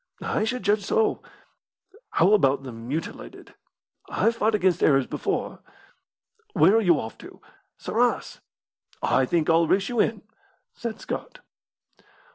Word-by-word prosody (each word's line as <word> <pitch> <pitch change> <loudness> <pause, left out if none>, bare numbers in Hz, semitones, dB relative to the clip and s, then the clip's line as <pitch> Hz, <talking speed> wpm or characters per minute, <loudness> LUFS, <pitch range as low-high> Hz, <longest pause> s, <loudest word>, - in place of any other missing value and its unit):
"I 215 - 0
should 250 +1 -3
judge 205 +1 +2
so." 220 +2 +1 0.9
"How 185 +5 +3
about 135 -9 +3
the 130 - -7
'mutilated'?" 120 +8 -7 0.6
"I've 230 +1 +1
fought 220 -1 +1
against 185 -4 +1
Arabs 135 -3 +4
before." - - -3 0.9
"Where 200 - +5
are - - +3
you 175 -7 +3
off 110 - -7
to?" - - -13 0.4
"Sarras." - - -1 0.6
"I 130 - +2
think 165 0 0
I'll 165 0 +4
race 195 +3 +1
you 240 -2 -2
in," 215 -1 +1 0.5
said 230 -2 -6
Scott. - - -6
190 Hz, 130 wpm, -25 LUFS, 150-220 Hz, 0.9 s, Where